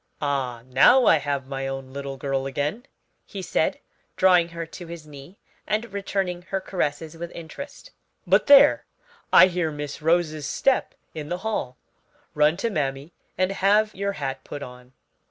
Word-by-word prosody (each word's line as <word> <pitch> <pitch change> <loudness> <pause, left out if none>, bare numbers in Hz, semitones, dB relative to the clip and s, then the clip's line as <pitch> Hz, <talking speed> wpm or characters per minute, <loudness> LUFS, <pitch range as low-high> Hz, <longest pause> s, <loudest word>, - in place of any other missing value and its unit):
"Ah, 130 -5 -2
now 190 - +5
I 165 - +6
have 140 -2 -2
my 135 0 -4
own 135 -1 -6
little 140 -1 -6
girl 135 0 -2
again," 150 - -3 0.4
he - - -8
said, - - 0 0.4
drawing 180 -2 +4
her 170 0 -6
to 170 +2 -10
his 165 -2 -9
knee 150 +5 -13 0.3
and 215 +1 -2
returning 195 -3 -2
her 190 +2 -3
caresses 160 -4 -3
with 170 +1 -6
interest: 170 - -9 0.3
"But - - +3
there, 280 -1 +7 0.5
I - - +9
hear 175 -3 -1
Miss 145 0 -6
Rose's 155 -2 +1
step 270 - +1 0.2
in 155 -2 -6
the 175 - -2
hall. 130 - -2 0.6
Run 150 +2 +3
to 230 +4 -1
mammy 140 -1 -3 0.2
and 185 +1 +1
have 210 +2 +2
your 200 +1 -2
hat 135 -6 -5
put 145 -1 -7
on." 125 0 -12
160 Hz, 160 wpm, -24 LUFS, 140-190 Hz, 0.6 s, I